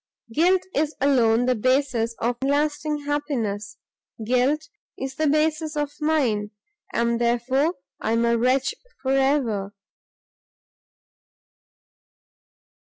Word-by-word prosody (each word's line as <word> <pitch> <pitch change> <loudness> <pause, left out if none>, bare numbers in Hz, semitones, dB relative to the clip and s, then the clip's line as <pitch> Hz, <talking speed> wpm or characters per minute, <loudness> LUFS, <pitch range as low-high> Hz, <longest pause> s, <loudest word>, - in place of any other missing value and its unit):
Guilt 360 +6 +3
is 300 0 0
alone 245 -4 +3
the 255 - +3
basis 250 -1 +1
of 240 +2 0
lasting 295 +1 0
unhappiness; 230 -9 -2 0.5
Guilt 255 +6 +1 0.3
is 265 0 -4
the 310 +2 0
basis 310 +1 +1
of 295 -1 -1
mine, 255 -10 +1 0.4
and 235 0 0
therefore 255 +7 +1 0.2
I 220 - -1
am 230 +1 +2
a 235 0 +3
wretch 255 +3 +2 0.3
for 265 - 0
ever!" 265 -8 +1
265 Hz, 105 wpm, -24 LUFS, 235-295 Hz, 0.5 s, Guilt